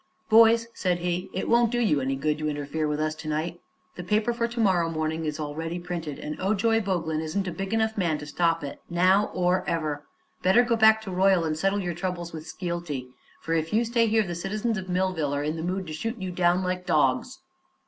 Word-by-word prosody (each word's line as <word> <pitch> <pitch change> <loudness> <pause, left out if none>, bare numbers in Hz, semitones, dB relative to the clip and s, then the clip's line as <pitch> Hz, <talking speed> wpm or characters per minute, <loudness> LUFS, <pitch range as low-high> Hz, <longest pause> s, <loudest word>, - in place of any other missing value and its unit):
"Boys," 230 +1 +6
said 180 -2 0
he, 175 +1 -2
"it 190 - -3
won't 235 0 +4
do 240 - 0
you 155 -12 +2
any 135 +1 -1
good 150 +2 -1
to 155 0 -1
interfere 145 +1 -2
with 150 0 -1
us 155 0 0
to 155 0 -9
night. 160 +3 -3 0.3
The 180 - -7
paper 210 +6 +1
for 235 0 0
to 235 0 -6
morrow 180 -6 +3
morning 160 0 -2
is 150 0 -3
already 160 +3 -4
printed, 170 -4 -5
and 150 0 -6
Ojoy 215 +3 +2
Boglin 165 -5 -1
isn't 175 +5 -2
a - - -2
big 195 +3 -5
enough 220 -1 0
man 165 -5 +1
to 150 - -8
stop 165 +2 0
it, 140 - -7
now 185 +4 +3
or 180 +1 +1
ever. 155 -3 -2 0.4
Better 190 +7 +5
go 240 -1 +1
back 220 0 +5
to 195 - -6
Royal 185 -1 +3
and 155 -1 -1
settle 195 +5 0
your 175 -1 -2
troubles 175 -1 -4
with 160 0 -8
Skeelty, 170 -8 -4 0.3
for 165 - -2
if 160 0 0
you 230 +2 +3
stay 230 0 +2
here 220 0 +3
the 175 - -4
citizens 210 +6 -2
of 190 -2 -5
Millville 180 -6 0
are 145 - -1
in 155 +2 -1
the 160 - -4
mood 185 +3 -2
to 155 - -7
shoot 225 +10 -3
you 190 -3 -4
down 180 +1 +2
like 180 0 -3
dogs." - - +1
175 Hz, 230 wpm, -26 LUFS, 155-200 Hz, 0.4 s, Boys